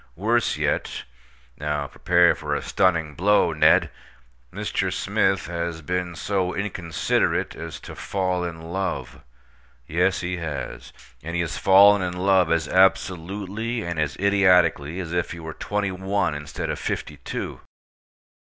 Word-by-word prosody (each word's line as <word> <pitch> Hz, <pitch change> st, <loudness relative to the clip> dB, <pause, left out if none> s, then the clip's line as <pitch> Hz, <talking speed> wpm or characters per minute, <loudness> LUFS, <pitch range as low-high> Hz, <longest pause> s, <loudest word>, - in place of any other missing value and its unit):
Worse 115 Hz, +4 st, +1 dB
yet -, -, -1 dB, 0.6 s
(now 75 Hz, -1 st, -2 dB
prepare 70 Hz, -, +3 dB
for -, -, -3 dB
a -, -, -3 dB
stunning 85 Hz, -5 st, +1 dB
blow, 95 Hz, +1 st, +3 dB
Ned!), 75 Hz, -, +4 dB, 0.6 s
Mr. -, -, -2 dB
Smith 95 Hz, 0 st, +1 dB
has 85 Hz, -1 st, -4 dB
been 90 Hz, +1 st, -2 dB
so 95 Hz, +1 st, -1 dB
inconsiderate 90 Hz, -5 st, -1 dB
as 80 Hz, -3 st, -7 dB
to -, -, -9 dB
fall 95 Hz, -2 st, -2 dB
in 85 Hz, -2 st, -5 dB
love. 90 Hz, -10 st, -3 dB, 0.6 s
Yes, 90 Hz, +6 st, +1 dB
he 90 Hz, 0 st, -3 dB
has. 80 Hz, -4 st, -6 dB, 0.3 s
And 85 Hz, +3 st, -5 dB
he 85 Hz, -, +1 dB
has 85 Hz, -1 st, -3 dB
fallen 100 Hz, +1 st, +7 dB
in 90 Hz, -1 st, -2 dB
love 95 Hz, -2 st, +3 dB
as 85 Hz, -2 st, +1 dB
absolutely 95 Hz, +4 st, +1 dB
and 85 Hz, -2 st, -3 dB
as 75 Hz, -2 st, -1 dB
idiotically 90 Hz, -5 st, +3 dB
as 85 Hz, -2 st, -5 dB
if 90 Hz, 0 st, -1 dB
he 85 Hz, -, -8 dB
were 80 Hz, -1 st, -7 dB
twenty 105 Hz, +2 st, -2 dB
one 95 Hz, -1 st, -1 dB
instead 75 Hz, -1 st, -4 dB
of -, -, -4 dB
fifty 75 Hz, -, -4 dB
two. -, -, -6 dB
90 Hz, 140 wpm, -24 LUFS, 80-95 Hz, 0.6 s, fallen